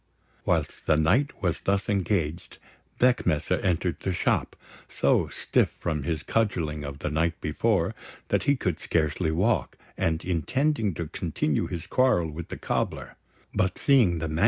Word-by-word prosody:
Whilst - - -1
the 75 - +4
knight 110 - +1
was 85 -3 0
thus 100 0 0
engaged, 90 -4 -1 0.4
Beckmesser 125 -11 +2
entered 90 -1 0
the 95 - -2
shop, 90 - 0 0.3
so - - +2
stiff - - 0
from 80 -4 -1
his 75 +2 -2
cudgelling 85 -9 0
of 70 -1 -6
the 75 - -3
night 80 +2 0
before 85 +3 +1 0.4
that - - +2
he 140 - +5
could 90 - -2
scarcely 80 +1 0
walk, 95 +9 +1 0.2
and, 80 -1 0
intending 105 - 0
to 85 - -3
continue 75 -2 -1
his 85 -2 -5
quarrel 100 -8 +2
with 80 +2 -7
the - - -6
cobbler; - - -2 0.4
but, 95 0 0
seeing 120 - +4
the 80 0 -2
MS. 80 +1 -3
85 Hz, 155 wpm, -26 LUFS, 80-100 Hz, 0.4 s, he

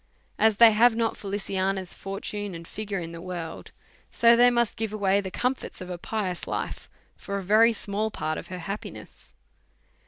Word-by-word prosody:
As 220 -2 +4
they 230 0 +9
have 225 +2 +5
not 230 -1 0
Feliciana's 195 -2 -2
fortune 195 0 -5
and 165 0 -9
figure 210 -2 -4
in 165 -1 -6
the 170 0 -8
world, 175 -3 -6 0.4
so 235 0 +5
they 245 +1 +6
must 235 -2 +1
give 220 -1 -3
away 200 -1 +2
tlie 190 -1 -6
comforts 255 +6 -2
of 185 0 -7
a 175 - -5
pious 190 -3 -3
life - - -4 0.3
for 200 - -5
a 195 - -4
very 215 +5 +5
small 215 0 -2
part 155 -6 -3
of - - -10
her 180 - -6
happiness. 195 +4 -8
200 Hz, 180 wpm, -26 LUFS, 185-220 Hz, 0.4 s, they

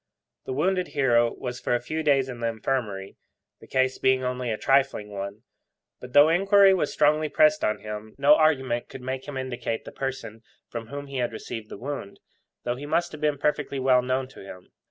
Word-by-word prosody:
The - - -3
wounded 180 +5 +1
hero 120 -4 +2
was 125 -1 -5
for 120 - 0
a - - +1
few 155 +6 -4
days 140 -3 +3
in 125 -2 -7
the 115 - -1
Infirmary, 110 -4 -3 0.4
the - - -15
case 130 0 +1
being 130 0 +2
only 125 -1 -2
a 110 - -1
trifling 135 -6 +1
one. 100 +2 -6 0.6
But, 125 0 -11
though 145 +1 +8
inquiry 195 +3 +5
was 175 -6 0
strongly 155 +1 +2
pressed 155 +1 +4
on 105 - 0
him, 105 0 -7
no 140 +2 +6
argument 135 -6 +2
could 130 - -10
make 130 +1 -4
him 145 -2 -5
indicate 125 -3 -4
the - - -8
person 135 -5 -5 0.3
from 115 -1 -6
whom 140 +3 -6
he 140 -1 -6
had 120 -2 0
received 110 0 -7
the - - -8
wound, 130 -4 -6 0.4
though 120 0 -2
he 145 +2 -7
must 170 +3 0
have 155 - -10
been 150 -1 +1
perfectly 145 -1 -1
well 130 -1 +4
known 130 +1 -1
to - - -14
him. 90 -2 -12
130 Hz, 205 wpm, -26 LUFS, 120-145 Hz, 0.6 s, though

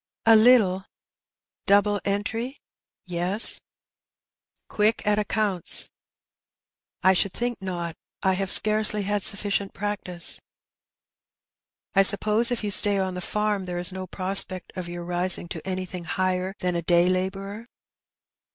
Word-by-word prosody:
'' - - -69
'' - - -50
A 225 0 +6
little." 215 -5 +4 0.4
" - - -67
Double 205 0 +2
entry? 225 +6 -3 0.2
" - - -68
" - - -69
Yes." 180 +4 +5 0.6
" - - -61
Quick 215 +2 0
at 210 0 +1
accounts? 210 -4 0 0.5
" - - -49
"I 190 +1 +5
should 190 +1 0
think 240 -2 -4
not. 175 -3 -5 0.3
I 190 - +2
have 195 0 -3
scarcely 215 0 +3
had 205 +1 -2
sufficient 200 0 +1
practice." 190 -4 -4 0.8
" - - -68 0.7
I 195 - +4
suppose 210 +4 +3
if 245 -2 -3
you 205 - -3
stay 200 0 +3
on 190 -1 -2
the 180 - -6
farm 210 0 -2
there 180 -1 -5
is 175 +1 0
no 185 0 -7
prospect 185 0 +1
of 180 -2 -6
your 175 0 -7
rising 175 0 0
to - - -8
anything 185 -2 -5
higher 185 +3 -2
than 180 -1 -2
a 170 - -1
day 175 +1 +2
labourer 195 +4 -4
195 Hz, 155 wpm, -24 LUFS, 185-210 Hz, 0.8 s, A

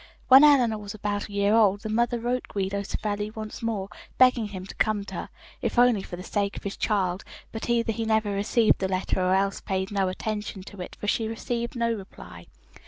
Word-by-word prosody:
"When 265 +2 +10
Eleanor 250 -7 +5
was 205 0 -7
about 205 0 -3
a - - -11
year 200 +1 +2
old, 205 -3 +4
the 215 - -5
mother 235 +2 +1
wrote 245 +2 -2
Guido 200 0 -2
Savelli 205 +1 -3
once 215 +2 -7
more, 220 -4 -2 0.3
begging 250 -4 +5
him 190 -2 -7
to - - -9
come 210 -2 0
to - - -9
her, - - -5 0.3
if - - -2
only 245 -4 +5
for 180 - -7
the 180 - -8
sake 200 0 -2
of - - -8
his 200 - -4
child, 190 -3 0 0.3
but 225 +1 -5
either 230 -1 +2
he 225 - -3
never 220 -1 +1
received 210 +3 +2
the 190 - 0
letter 185 0 -1
or 185 +1 +3
else 195 0 0
paid 190 0 -2
no 195 -2 +1
attention 210 0 -4
to 200 -1 -10
it, 180 - -7
for - - -5
she 220 +1 +1
received 235 +2 -3
no 235 -1 +1
reply. 190 - -10
210 Hz, 220 wpm, -26 LUFS, 195-230 Hz, 0.3 s, When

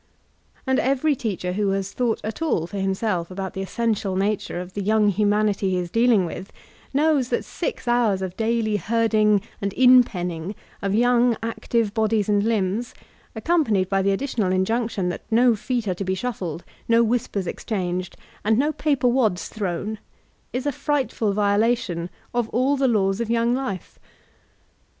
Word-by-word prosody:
And 265 -1 +2
every 275 +3 +2
teacher 190 -7 -3
who 205 +1 0
has 195 0 -2
thought 240 -3 0
at 220 +8 -5
all 290 - +1
for 200 +4 -7
him 195 0 0
self 185 -5 -1
about 190 0 -5
the 190 - -4
essential 210 -1 -1
nature 200 -2 -1
of 180 +1 -7
the 205 - -3
young 210 +1 +3
humanity 205 0 +1
he 185 - 0
is 175 -1 -3
dealing 230 -4 +4
with, 185 +3 -7 0.4
knows 285 -3 +2
that - - -1
six 480 - -4
hours 230 -6 +2
of 185 -1 -5
daily 225 -1 0
herding 215 0 +2 0.2
and 200 0 -1
in 255 0 +7
penning 180 -2 -5 0.3
of 195 0 0
young, 245 0 +3
active 230 -1 -1
bodies 220 -2 +1
and 205 -1 +3
limbs, 220 +1 -1 0.4
accom 325 +9 +2
panied 195 -7 0
by 195 -1 +2
the 195 - +1
additional 205 -2 0
injunction 195 0 0
that 175 - -4
no 235 +1 +4
feet 235 +1 -2
are 185 - +1
to 180 - -5
be 190 0 -1
shuffled, 185 -7 -4 0.2
no 230 0 +5
whispers 220 -4 -1
exchanged, 180 -2 -3 0.3
and 220 +1 +3
no 290 +4 +2
paper 280 -4 +1
wads 235 -7 +1
thrown, 205 +1 -3 0.5
is 250 +2 -3
a 290 - +1
frightful 265 -6 -1
violation 205 -3 +1 0.2
of 240 -2 0
all 260 +5 +2
the 270 -1 +2
laws 195 -2 +1
of 230 - -3
young 235 +1 +2
life. 250 -9 -4
215 Hz, 170 wpm, -23 LUFS, 190-240 Hz, 0.5 s, in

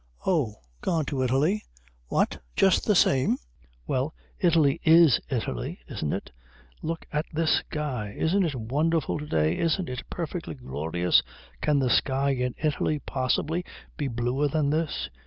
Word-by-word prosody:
"Oh, 150 - +1 0.3
gone 165 -4 0
to 135 -2 -2
Italy." 140 - +2 0.4
"What, - - +1 0.2
just 190 -1 +4
the 210 - +4
same?" 130 -6 +4 0.5
"Well, 135 - -1 0.2
Italy 165 -7 +3
is 160 -5 +7
Italy, 65 - -3
isn't 75 - -3
it? - - -4 0.5
Look 165 +1 -4
at 150 +2 0
this 160 0 +2
sky. 125 -9 -4
Isn't 190 +5 +2
it 160 -5 -1
wonderful 150 +7 0
to 150 - -6
day, 80 - +2
isn't 170 +2 +1
it 125 0 -4
perfectly 170 -1 -4
glorious? 85 - +1 0.4
Can 150 -1 +2
the 130 -2 +2
sky 135 +3 +2
in 125 -2 -1
Italy 155 0 0
possibly 145 +5 -1 0.3
be 145 -4 -2
bluer 125 +4 0
than 145 0 +1
this?" 155 - -1
145 Hz, 145 wpm, -27 LUFS, 125-160 Hz, 0.5 s, is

